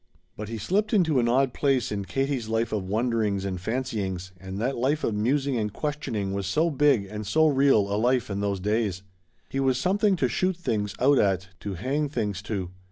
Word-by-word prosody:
But 105 0 -6
he 115 - -4
slipped 205 - 0
into 160 -9 +3
an 120 -1 +2
odd 130 +1 +2
place 135 -4 +1
in 100 -1 -3
Katie's 135 +3 -1
life 115 +1 0
of 95 -3 -2
wonderings 110 -3 0
and 95 -2 -3
fancyings, 100 -5 -3
and 95 +1 -7
that 125 +5 0
life 140 +6 0
of 115 - 0
musing 135 +5 +1
and 105 -2 -1
questioning 130 -9 -3
was 100 -1 -2
so 160 - +2
big 140 -7 +3
and 105 +1 -6
so 160 +9 +4
real 135 -5 +4
a 100 +1 -1
life 125 0 +1
in 100 - -2
those 100 -1 -1
days. 105 -2 -1 0.5
He 135 - -2
was 135 -2 +2
something 195 +5 +2
to 135 -8 +1
shoot 185 +9 0
things 105 - -2
out 135 +2 +4
at, 95 -2 +1
to 100 -2 -5
hang 140 - -1
things 105 -8 -2
to. 95 -5 -3
115 Hz, 205 wpm, -26 LUFS, 100-140 Hz, 0.5 s, so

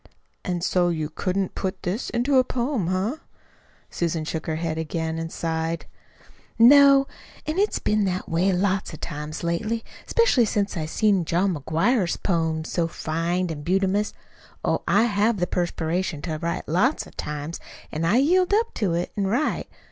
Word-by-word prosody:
"And 175 -2 -2
so 180 -1 +2
you 155 -3 -2
couldn't 190 0 -1
put 190 -1 -4
this 190 +7 -2
into 255 +3 +2
a - - +5
poem 245 - -1
eh?" 195 +10 -1 0.7
Susan 165 -2 -1
shook 160 0 -4
her 160 - -1
head 160 0 -2
again 160 0 -2
and 165 0 -4
sighed. 165 0 -2 0.7
"No. 275 +3 +7 0.4
An' 310 +4 -1
it's 415 +1 +2
been 210 -1 +1
that 185 -1 -2
way 175 +4 +2
lots 190 -2 0
o' - - -10
times 150 0 -6
lately, 215 +7 -1 0.2
'specially 465 - +4
since 205 -1 -1
I 155 -3 -2
seen 200 +1 +2
John 180 +4 +1
McGuire's 170 - +1
poems 160 -3 -1
so 170 -2 +1
fine 165 +2 -2
an' 150 -2 -5
bumtious! 195 +4 +1 0.5
Oh, - - +1
I 205 - +4
have 215 0 +2
the 180 - +1
perspiration 175 -2 -2
to 155 -3 -3
write, 170 +1 -3
lots 210 - +1
o' - - -14
times, 150 +2 -5 0.3
an' 155 - -3
I 180 +8 +3
yield 365 +8 +3
up 460 +2 +1
to 190 -7 0
it 175 - -2
an' 200 -2 0
write. 245 +10 0
180 Hz, 170 wpm, -24 LUFS, 165-220 Hz, 0.7 s, No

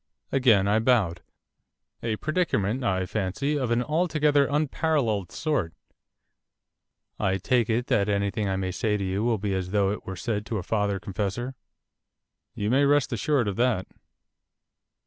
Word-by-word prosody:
Again 115 -8 +4
I 105 +2 +3
bowed. 110 -8 +2 0.8
'A 115 -1 -1
predicament, 130 - 0
I 95 -5 0
fancy, 110 +10 -2
of 130 -5 -1
an 120 +1 +2
altogether 150 -2 +2
unparalleled 145 - 0
sort. 145 - -1 1.4
I 95 0 +1
take 120 +3 +1
it 115 +2 +1
that 100 -3 +1
anything 100 0 0
I 95 - 0
may 95 -1 -2
say 105 +2 0
to 100 - -3
you 95 +2 -1
will 115 -1 +2
be 100 -1 -2
as 95 -1 -2
though 100 0 +2
it 105 - -5
were 95 - -4
said 105 +1 -2
to 115 - -2
a 95 - -3
father 105 -1 0
confessor.' 100 +7 -3 1.0
'You 105 +2 -1
may 135 +3 +4
rest 140 -2 +3
assured 120 +2 +1
of 100 - -2
that. 120 -6 +1
110 Hz, 155 wpm, -26 LUFS, 100-130 Hz, 1.4 s, Again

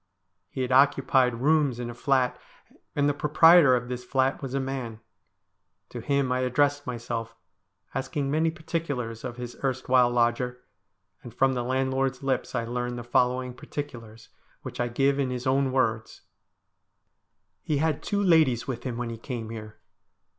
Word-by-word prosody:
He 130 - -3
had 125 - -3
occupied 130 -2 +3
rooms 145 -4 +2
in 120 - -4
a 120 - -6
flat, 130 0 0 0.5
and 145 0 +2
the 145 - +2
proprietor 150 -1 +6
of 120 0 -2
this 125 0 -5
flat 130 +2 0
was 135 -1 -4
a - - +1
man. 130 -4 -4 0.9
To - - -7
him 140 -2 0
I 125 - +1
addressed 145 +3 +1
myself, 115 -2 -4 0.6
asking 135 +1 -2
many 160 +2 +2
particulars 155 -8 -4
of 125 -2 -6
his 120 -1 -7
erstwhile 130 -2 +2
lodger, 120 +1 0 0.6
and 120 - -10
from 135 +3 +2
the 125 - -1
landlord's 130 +1 -1
lips 130 -1 -1
I 115 -2 -1
learned 120 +1 -3
the 120 - -6
following 125 +1 +1
particulars, 115 -5 -8 0.3
which - - -8
I 120 - +1
give 135 +3 +1
in 135 -2 0
his 125 0 -4
own 135 0 +2
words: 115 -4 -1 0.7
' - - -51
He 150 - -1
had 155 -1 0
two 205 0 -1
ladies 155 - +4
with 125 -3 -4
him 120 -3 -3
when 120 -1 -3
he 115 - -7
came 115 -3 -6
here. 110 -1 -8
130 Hz, 165 wpm, -26 LUFS, 120-140 Hz, 0.9 s, proprietor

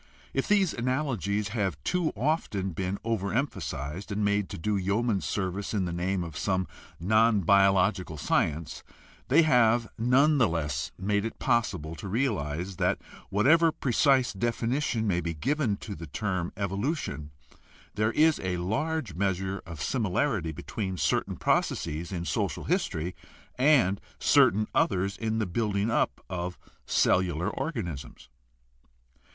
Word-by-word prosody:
If - - -1
these 200 -4 +3
analogies 115 - -1
have 100 - -1
too 180 -3 0
often 105 - -1
been 95 +3 -2
overemphasized 100 - -2
and 105 +1 0
made 100 -1 +1
to - - -6
do 105 +6 -1
yeoman 100 +2 0
service 100 +2 -2
in 95 -3 +1
the 85 - -3
name 90 +1 -1
of 80 -3 -8
some 95 -2 0 0.3
non 110 +4 +3
biological 95 -2 +3
science, 75 +2 -1 0.4
they 155 +6 +5
have 120 -5 +4
none 135 +6 +4
the 120 - +5
less 75 -4 -2
made 100 +2 0
it 115 - -4
possible 105 - 0
to 100 - -7
realize 95 - -1
that - - +1 0.3
whatever 160 - +4
precise 135 -2 +2
definition 120 +3 -1
may 90 -4 +1
be 85 0 -3
given 130 - 0
to 105 - -7
the 85 -1 -8
term 95 +2 -2
"evolution" 100 - -2 0.6
there 110 +1 +1
is 155 0 +4
a 90 -1 -2
large 125 - -2
measure 95 +1 -1
of 85 -3 -6
similarity 110 - 0
between 95 +5 -4
certain 70 -4 0
processes 80 +4 0
in 85 -2 -3
social - - -1
history 85 +3 -1 0.4
and 125 -8 +3 0.2
certain 105 +3 +4
others 95 +1 +1
in 110 -1 -2
the 110 - +1
building 105 +2 0
up - - 0
of 90 -2 -4 0.3
cellular 90 +1 +2
organisms. 85 - -5
100 Hz, 135 wpm, -28 LUFS, 90-120 Hz, 0.6 s, they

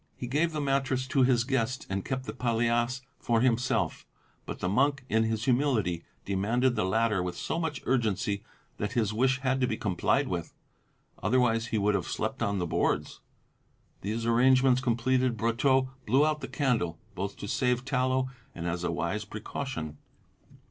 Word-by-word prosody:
He - - -6
gave 150 +7 +1
the 155 - -3
mattress 135 -2 0
to 140 -1 +2
his 125 -2 +4
guest 125 -1 -1
and 95 0 -2
kept 130 -1 -3
the - - -5
palliasse 120 +1 +1 0.2
for 115 -1 +1
himself; 115 -7 +1 0.4
but - - -4
the - - -2
monk 135 +6 +2
in 110 0 +3
his 110 0 -1
humility 120 - +1 0.2
demanded 115 +6 +1
the 95 - +1
latter 105 0 +2
with 90 -1 -4
so 165 - -2
much 160 -4 -3
urgency 105 -5 0 0.3
that 105 +3 -3
his 110 -4 +1
wish 130 +3 +2
had 135 0 +1
to 125 - +3
be 110 - -2
complied 95 -5 +1
with; - - -4 0.7
otherwise 115 +1 +2
he 110 - -1
would 105 0 +2
have 95 -4 -1
slept - - -3
on 100 0 +1
the 90 - 0
boards. 80 - 0 0.8
These 110 +3 -2
arrangements 130 +2 +4
completed, 125 0 +1
Brotteaux 130 +3 +2 0.2
blew 135 +7 +4
out 155 0 0
the - - -4
candle 115 - 0 0.2
both 100 +2 -4
to 100 - -6
save 125 +2 0
tallow 130 -1 +1 0.3
and 85 - -5
as 85 +1 -2
a - - 0
wise 85 +5 -2
precaution. 105 - -5
120 Hz, 170 wpm, -29 LUFS, 105-130 Hz, 0.8 s, his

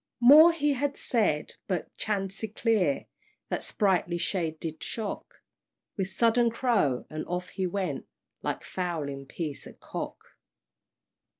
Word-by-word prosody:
More 295 +8 +9
he 295 -3 +1
had 285 +1 -1
said, 205 -11 +1
but 185 -3 -3
chanticleer 205 - 0 0.4
The - - 0
spritely 180 -4 +1
shade 165 -4 -1
did 160 -1 -5
shock 220 -3 -5 0.5
With 190 -2 -1
sudden 230 +4 +3
crow, 225 - +1
and 155 0 -3
off 180 +1 -3
he 185 0 -2
went, 190 +1 -3 0.3
Like - - -3
fowling 150 -7 -3
piece 150 -2 -5
at - - -14
cock! - - -5
190 Hz, 120 wpm, -28 LUFS, 165-230 Hz, 0.5 s, More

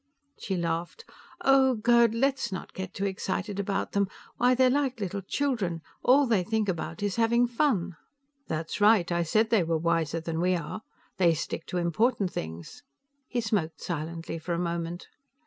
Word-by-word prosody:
She 190 - -2
laughed. 170 - -3 0.4
"Oh, 265 -1 +5
Gerd! 230 0 +4
Let's 270 0 +1
don't 190 - -6
get 190 -1 -5
too 200 - -2
excited 195 +1 -3
about 195 0 -1
them. 200 -1 +1 0.3
Why, 250 +1 +4
they're 260 +1 +5
like 270 -3 0
little 200 0 -3
children. 195 - -1 0.2
All 275 +3 +5
they 220 -7 +2
think 220 +2 0
about 165 0 -3
is 205 0 -1
having 235 +1 +3
fun." 230 - 0 0.5
"That's 160 +5 -3
right. 205 -5 +5
I 170 0 +1
said 215 +7 +1
they 225 -4 +5
were 165 0 0
wiser 165 0 0
than 165 0 -3
we 180 +1 +2
are. 170 +5 -5 0.4
They 170 -3 +4
stick 160 - -5
to 180 - -3
important 195 +4 +1
things." 80 - -7 0.5
He 245 - -1
smoked 205 -7 -1
silently 165 0 -4
for 170 +2 -3
a - - -2
moment. 170 0 -3
190 Hz, 170 wpm, -28 LUFS, 170-230 Hz, 0.5 s, Oh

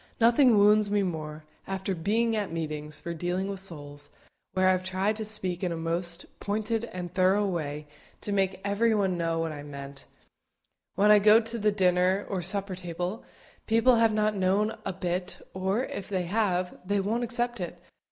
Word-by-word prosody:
Nothing 235 0 +5
wounds 210 +1 +5
me 205 -1 +2
more, 155 -3 -4 0.2
after 190 0 -2
being 220 +7 +1
at 205 -4 -2
meetings 155 -2 -3
for 170 - -5
dealing 175 +3 -2
with 195 -1 -4
souls, 145 -6 -6 0.4
where 185 0 +3
I - - +6
have 185 0 0
tried 190 +3 0
to 220 - -3
speak 190 -4 -2
in 180 - 0
a 165 - -3
most 170 +2 0
pointed 215 +2 -1
and 180 -5 -7
thorough 190 +2 +3
way 150 -5 -3 0.4
to 205 - -3
make 195 -2 0
everybody 205 -2 +2
know 165 -1 -1
what 165 -1 -1
I 145 -1 -7
meant, 140 -1 -9 0.9
when 205 +2 +5
I 210 - +8
go 210 +2 +7
to 230 0 -3
the 210 0 +3
dinner 185 0 +2
or 190 -3 -2
supper 195 +2 -2
table, 180 +3 -4 0.4
people 230 +2 +4
have 225 -1 +4
not 215 0 +1
known 200 +3 +1
a - - -1
bit, 180 0 -3 0.2
or, 190 +5 0
if 200 - -6
they 190 -3 -1
have, 185 -1 -1
they 200 +2 0
won't 220 +5 -1
accept 240 0 -1
it. 175 -1 -5
190 Hz, 180 wpm, -28 LUFS, 175-210 Hz, 0.9 s, I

